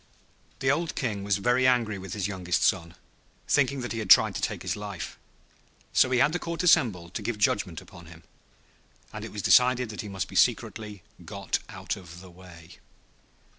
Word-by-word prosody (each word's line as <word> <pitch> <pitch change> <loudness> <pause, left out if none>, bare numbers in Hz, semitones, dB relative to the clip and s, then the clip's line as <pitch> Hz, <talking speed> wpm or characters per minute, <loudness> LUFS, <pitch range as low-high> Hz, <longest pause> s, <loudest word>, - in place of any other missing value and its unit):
The 135 - +3
old 165 +3 -1
King 105 -7 -2
was 100 -1 +1
very 125 +5 +2
angry 115 -5 +1
with 95 +1 -7
his 100 -2 -2
youngest 90 -3 -1
son, 85 -2 +1 0.5
thinking 140 -1 +2
that 120 - -5
he 115 - -3
had 105 -4 -5
tried - - +7
to - - -4
take - - -3
his - - -2
life. 100 -5 -7 0.8
So 130 - +4
he 130 - +1
had 145 +5 +3
the 175 - -1
Court 170 0 -4
assembled 110 - +2
to - - -4
give 120 -3 -3
judgment 100 -5 0
upon 85 -5 -14
him, 85 0 -14 0.9
and - - -6
it - - -7
was - - -6
decided 125 -1 +4
that 105 - -6
he 105 - -8
must 95 -3 -4
be - - -12
secretly 105 -4 0 0.2
got - - -3
out - - -5
of 85 -3 -12
the 90 0 -13
way. 85 -1 -15
105 Hz, 195 wpm, -27 LUFS, 90-125 Hz, 0.9 s, tried